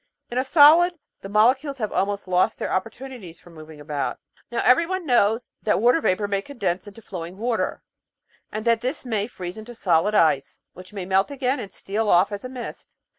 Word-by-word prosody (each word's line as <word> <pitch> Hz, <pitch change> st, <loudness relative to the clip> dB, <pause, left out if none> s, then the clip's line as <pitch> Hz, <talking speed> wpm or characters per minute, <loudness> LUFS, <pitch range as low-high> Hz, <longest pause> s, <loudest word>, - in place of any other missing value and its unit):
In 245 Hz, -, 0 dB
a -, -, +1 dB
solid 325 Hz, +5 st, +6 dB, 0.3 s
the 195 Hz, -, -8 dB
molecules 260 Hz, +7 st, +2 dB
have 215 Hz, -4 st, -3 dB
almost 200 Hz, 0 st, -1 dB
lost 180 Hz, 0 st, +2 dB
their -, -, -3 dB
opportunities 225 Hz, -2 st, -5 dB
for 175 Hz, -, -17 dB
moving 155 Hz, -1 st, -12 dB
about. 145 Hz, -2 st, -3 dB, 0.3 s
Now 235 Hz, -, -1 dB
everyone 335 Hz, +7 st, +3 dB
knows 235 Hz, -3 st, +2 dB
that 210 Hz, -, +1 dB
water 245 Hz, +9 st, +4 dB
vapour 205 Hz, -2 st, +1 dB
may 200 Hz, -1 st, -1 dB
condense 195 Hz, -7 st, -3 dB
into 205 Hz, +2 st, -12 dB
flowing 180 Hz, -1 st, -7 dB
water, 230 Hz, +1 st, -2 dB, 0.7 s
and 215 Hz, +1 st, -5 dB
that 230 Hz, -1 st, +3 dB
this 260 Hz, +3 st, -3 dB
may 215 Hz, -4 st, -1 dB
freeze 180 Hz, -3 st, -7 dB
into 240 Hz, +2 st, -10 dB
solid 185 Hz, 0 st, +2 dB
ice, 155 Hz, -7 st, +2 dB
which 185 Hz, +1 st, -13 dB
may 195 Hz, -3 st, -5 dB
melt 190 Hz, +4 st, +2 dB
again 270 Hz, -1 st, -1 dB
and 195 Hz, -, -7 dB
steal 210 Hz, +3 st, -2 dB
off 180 Hz, +3 st, +4 dB
as 205 Hz, -1 st, -5 dB
mist. 255 Hz, -2 st, -8 dB
215 Hz, 185 wpm, -23 LUFS, 185-250 Hz, 0.7 s, solid